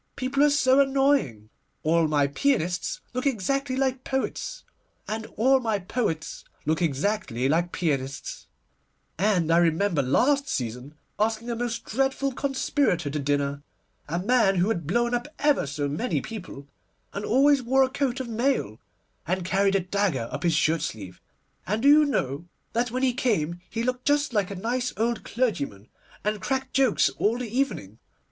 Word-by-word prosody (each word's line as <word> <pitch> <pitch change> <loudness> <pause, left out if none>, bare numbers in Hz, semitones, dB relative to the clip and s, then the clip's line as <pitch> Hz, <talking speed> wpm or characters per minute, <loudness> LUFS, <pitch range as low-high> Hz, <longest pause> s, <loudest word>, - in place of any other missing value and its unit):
People 265 +2 -1
are 295 - +6
so 270 -2 +4
annoying. 270 - +2 0.3
All 165 +1 +3
my 145 -2 +2
pianists 180 - 0
look 255 +3 -1
exactly 275 +3 0
like 260 -1 0
poets, - - -3 0.4
and 220 +1 -4
all 265 +5 +4
my 225 -4 0
poets 185 -5 -3 0.2
look 155 +3 0
exactly 145 - 0
like 170 +4 +1
pianists; 140 -5 -3 0.7
and 185 -5 +2
I 165 - +5
remember 170 0 +2
last 275 - +2
season 125 +4 -4 0.2
asking 225 +2 0
a - - -2
most 235 -1 -3
dreadful 270 +2 0
conspirator 260 - 0
to 150 - -2
dinner, 140 0 -1 0.5
a 165 +3 -2
man 195 0 +3
who 180 +3 +2
had 170 -9 -2
blown 240 +6 +1
up 245 +2 -1
ever 295 - +2
so 145 +1 -2
many 155 - -1
people, 185 -10 -8 0.5
and 200 - -4
always 275 +4 +4
wore 265 +2 +3
a - - +2
coat 265 -1 -1
of 260 - -4
mail, 230 - -1 0.5
and 185 +1 -1
carried 195 +1 +2
a 195 - +3
dagger 185 - -1
up - - -4
his 170 -3 +2
shirt 160 0 +2
sleeve; 105 - -6 0.5
and 215 +5 -1
do - - +5
you 300 +1 +7
know 150 - -2 0.3
that 240 +1 +1
when 255 +3 -2
he 255 -2 +3
came 175 -10 -1
he 230 0 -3
looked 250 +1 -2
just 290 -2 +2
like 205 -4 +1
a 200 - -5
nice 245 +6 -2
old 230 +2 0
clergyman, 140 - -2 0.3
and 210 -1 -1
cracked 265 +4 -2
jokes 265 -5 +3
all 220 +3 +2
the 240 -2 -5
evening? 115 - -2
215 Hz, 165 wpm, -26 LUFS, 160-260 Hz, 0.7 s, you